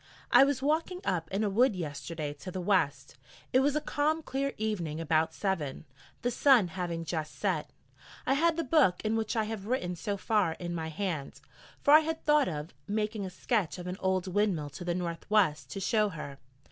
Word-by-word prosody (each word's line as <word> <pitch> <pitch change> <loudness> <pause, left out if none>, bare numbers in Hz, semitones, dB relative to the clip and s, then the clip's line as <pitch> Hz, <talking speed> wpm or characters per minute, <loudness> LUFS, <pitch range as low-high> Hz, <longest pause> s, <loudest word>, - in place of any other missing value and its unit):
I - - +8
was 275 -1 +1
walking 325 +5 0
up 165 -3 -1
in 195 +3 -1
a 210 - +1
wood 240 +2 +3
yesterday 155 -2 -4
to 150 +6 -9
the 185 - -4
west 145 -10 0 0.3
it 255 - +6
was 285 +2 +2
a 305 - +1
calm 310 +2 0
clear 275 0 -2
evening 180 -8 -2
about 160 0 +1
seven, 165 -8 -2 0.4
the 245 - +1
sun 245 -9 +5
having 170 -1 -4
just 155 -2 -3
set. - - -1 0.6
I - - +3
had 330 +3 +2
the 330 - 0
book 260 - +3
in 215 +1 +1
which 220 0 -1
I 220 - +2
have 215 -2 -5
written 200 -8 -1
so 200 +4 -3
far 200 -5 +1
in 175 0 -5
my 160 -2 -3
hand, 160 -4 -4 0.4
for 285 - +4
I 305 - +11
had 320 0 -3
thought 300 -2 +4
of 150 +1 -5
making 210 -1 -2
a - - -5
sketch 190 0 -1
of 180 - -7
an 180 +1 -4
old 190 -1 0
windmill 185 -6 0
to 140 - -8
the 175 0 -1
north 170 -1 -4
west 155 -10 +2
to - - -4
show 210 +2 +2
her. 145 -5 -8
190 Hz, 205 wpm, -30 LUFS, 165-245 Hz, 0.6 s, I